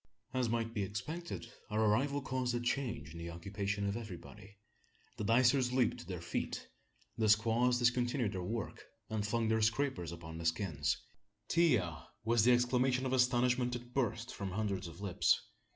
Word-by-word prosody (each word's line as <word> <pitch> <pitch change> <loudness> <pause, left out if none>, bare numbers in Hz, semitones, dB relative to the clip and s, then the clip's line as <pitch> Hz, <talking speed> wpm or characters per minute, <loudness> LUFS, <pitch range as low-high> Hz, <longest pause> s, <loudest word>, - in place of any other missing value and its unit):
As 130 -3 +1
might 115 0 -1
be 105 - -1
expected, 150 - -4 0.2
our 105 0 0
arrival 140 +7 +2
caused 130 -2 -1
a - - +1
change 120 - -2
in 85 - -8
the 85 0 -5
occupation 100 +4 -3
of 100 - -1
everybody. 100 -1 -9 0.6
The - - -3
dicers 125 +3 +4
leaped 125 -3 +2
to - - -9
their - - -5
feet - - -3 0.5
the 110 -1 +3
squaws 115 +3 +4
discontinued 120 -1 +2
their 95 - -3
work, 110 +4 -4 0.3
and 110 -1 0
flung 115 +1 +1
their 110 0 +2
scrapers 110 - +1
upon 80 -1 -8
the 85 - -5
skins. 80 -4 0 0.5
"Ti 170 -5 +5
ya!" 85 -6 -3 0.2
was 115 0 +3
the 125 - +6
exclamation 125 +1 +3
of 130 - 0
astonishment 125 -1 +3
that 120 0 -6
burst 120 -2 -1
from 100 -2 -4
hundreds 100 -2 -2
of 85 +3 -11
lips. 100 -4 +3
115 Hz, 170 wpm, -34 LUFS, 100-125 Hz, 0.6 s, the